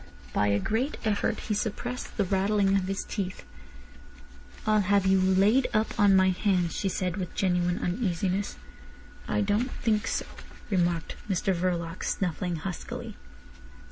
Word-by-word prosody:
By 105 - +2
a 100 0 +3
great 235 - -1
effort 210 -2 0
he 215 - -2
suppressed 225 +4 -3
the 205 - +3
rattling 195 +1 +2
of 190 -1 +1
his 195 0 -2
teeth. 190 -3 -4 1.2
"I'll 215 0 +4
have 200 0 +2
you 190 0 +4
laid 195 +7 +4
up 220 +2 0
on 200 -1 +6
my 190 0 +5
hands," 180 -3 +1
she 195 - 0
said, 185 0 -2
with 185 -3 -5
genuine 180 -1 +1
uneasiness. 185 0 -1 0.7
"I - - +1
don't 210 +5 +1
think 220 -3 0
so," - - -1 0.5
remarked 175 -3 0
Mr 190 +1 +1
Verloc, 170 -1 -2
snuffling 180 -1 -1
huskily. 170 +2 -6
195 Hz, 140 wpm, -28 LUFS, 180-205 Hz, 1.2 s, on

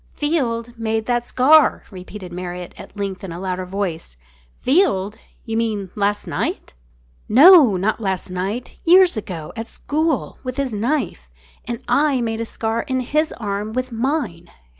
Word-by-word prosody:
"Field 240 -7 -1
made 220 -1 -1
that 240 0 0
scar!" 295 +4 +5
repeated 185 -1 -9
Marriott 180 0 -6
at - - -12
length 200 -2 -4
in 190 - -6
a 170 - -6
louder 185 -1 -3
voice. 180 - -4 0.4
"Field! 220 - +2 0.3
You 225 -2 -3
mean 215 -5 -1
last 205 0 0
night?" - - -3 0.6
"No, 280 - +8
not 215 +5 -1
last 190 -3 -2
night. 195 +7 -4
Years 360 0 +6
ago 175 -7 -6
at 225 0 -5
school, 310 +2 -2
with 255 0 -5
his 275 -4 -1
knife. 220 - -2 0.4
And 235 -1 -5
I 285 -2 +2
made 225 -1 -2
a - - -2
scar 225 0 -2
in 260 +1 -2
his 305 +5 0
arm 210 -1 -4
with 255 +1 -2
mine." 230 - -2
225 Hz, 155 wpm, -21 LUFS, 190-260 Hz, 0.6 s, No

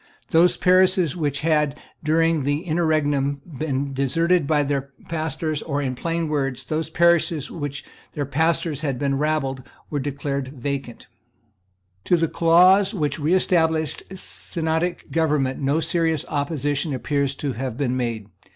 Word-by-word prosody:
Those 175 +2 +4
parishes 185 -3 +3
which 145 -5 -1
had, 150 -2 +1 0.3
during 165 -1 +2
the 145 +2 0
interregnum, 150 -5 +1 0.2
been 140 -2 -2
deserted 165 +4 +1
by 150 -1 +3
their 140 -1 -2 0.2
pastors, 155 -1 -2
or, 145 -2 -2
in 135 -3 -1
plain 165 +5 -2
words, 135 -4 -1
those 155 +1 -2
parishes 165 -3 +2
of - - -8
which 145 -2 -5 0.3
the 145 - -2
pastors 160 +1 0
had 140 -5 -1
been 140 0 0
rabbled, 145 -3 -1 0.3
were 145 - -1
declared 140 -1 -3
vacant, 135 -2 -4 1.0
To 175 - +3
the 165 0 +1
clause 180 +6 +4
which 150 -3 -1
reestablished 160 -1 +2
synodical 170 -1 -2
government 150 -5 +1
no 140 +3 +1
serious 165 -1 0
opposition 145 0 -1
appears 140 +2 -1
to 140 -2 -3
have 125 -1 -4
been 130 -3 0
made. 115 -4 -2
150 Hz, 140 wpm, -23 LUFS, 140-165 Hz, 1.0 s, Those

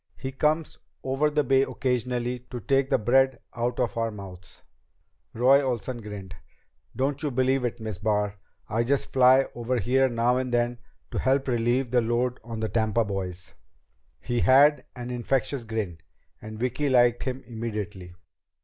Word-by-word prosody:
He 135 -1 -5
comes 155 +4 0 0.2
over 135 +3 +1
the 150 0 +1
Bay 135 0 +3
occasionally 125 -2 -1
to 125 - -5
take 135 +5 +1
the 140 - +3
bread 130 +3 +3 0.2
out 120 +1 -2
of 120 -5 0
our 115 0 0
mouths." 95 -4 -11 0.7
Roy 130 +4 +5
Olsen 125 -2 -3
grinned. 100 -4 -8 0.6
"Don't 135 +2 -1
you 150 - 0
believe 130 0 +1
it, 120 -1 -2
Miss 110 -5 -5
Barr. 105 -1 0 0.3
I 115 +1 0
just 135 +3 -1
fly 130 +1 +6
over 120 +1 -2
here 130 +5 +2
now 120 +1 +1
and 130 -1 -2
then 120 0 0 0.3
to - - -2
help 135 +1 +1
relieve 120 +1 +1
the 125 -1 +4
load 120 +2 0
on 115 -1 -6
the 110 - 0
Tampa 110 +1 +1
boys." 95 -3 -5 0.7
He 120 0 -2
had 140 +2 +5
an 125 0 -6
infectious 125 +1 -1
grin, 105 -7 -4 0.4
and 110 0 -8
Vicki 125 +5 -1
liked 120 -2 +4
him 130 0 -4
immediately. 105 -6 -6
120 Hz, 160 wpm, -26 LUFS, 110-130 Hz, 0.7 s, fly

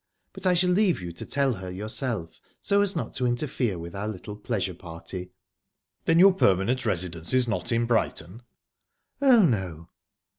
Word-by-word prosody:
But 190 -1 -3
I 180 - +4
shall 180 +1 +3
leave 190 -1 +3
you 90 -2 -6
to 85 - -8
tell 140 -2 +1
her 95 -3 -7
yourself, 105 - -3 0.2
so 200 0 +2
as 200 -2 +1
not 160 - -3
to 125 -2 0
interfere 120 - -1
with 85 0 -8
our 100 +2 -3
little 105 0 -6
pleasure 105 -3 -2
party." 90 +2 -8 0.8
"Then 165 - +4
your 190 +2 +8
permanent 120 - +2
residence 85 +1 0
is 125 -1 +3
not 115 - -2
in 115 0 +2
Brighton?" 110 -3 -1 0.8
"Oh, 255 -6 +6
no." 90 - -1
110 Hz, 170 wpm, -26 LUFS, 90-145 Hz, 0.8 s, your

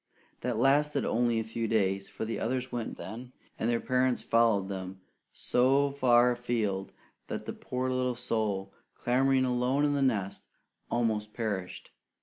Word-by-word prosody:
That 120 -2 -2
lasted 140 +3 +3
only 120 -1 +1
a - - -1
few 115 +1 -3
days; 100 -3 0
for - - -5
the 115 - -3
others 125 +2 -2
went 120 -2 -4
then, 115 +8 -8 0.3
and 115 - 0
their 120 -1 +2
parents 130 -1 +1
followed 115 -4 +3
them 95 -1 -6 0.3
so 135 +3 +2
far 125 -3 +4
afield 115 -6 -2 0.4
that - - -5
the - - -4
poor 125 0 -3
little 125 -1 0
soul, 110 -5 -2 0.2
clamouring 130 +1 +2
alone 125 +3 +1
in 145 - +2
the 140 - 0
nest, 105 -8 0 0.5
almost 110 -3 -1
perished. 100 -6 -4
120 Hz, 150 wpm, -30 LUFS, 110-130 Hz, 0.5 s, far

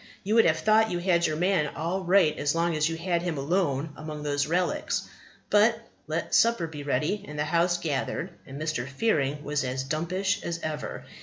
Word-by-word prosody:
You 210 - -1
would 230 0 +6
have 160 -1 +3
thought 215 +6 +4
you 175 - -1
had 175 -1 +2
your 155 - -1
man 175 -2 +2
all 175 +4 -2
right 180 -3 +4
as 145 +2 0
long 170 0 +1
as 155 +1 +2
you 165 - -3
had 170 0 0
him 175 -3 -2
alone 145 -1 0
among 155 -1 -7
these 145 -1 0
old - - -8
relics; 180 +1 0 0.4
but, 215 +3 +4 0.3
let - - -3
supper 230 -7 +4
be 155 -2 -7
ready, 155 +8 -1
and 150 - -8
the 150 - 0
house 170 +2 +2
gathered, 165 +3 -2 0.2
and 135 +1 -8
Mr. 155 -5 -2
Fearing 145 -2 0
was 145 0 -1
as 130 +1 -2
dumpish 180 +7 -1
as 170 -1 -3
ever. 155 -1 -4
165 Hz, 205 wpm, -27 LUFS, 150-180 Hz, 0.4 s, would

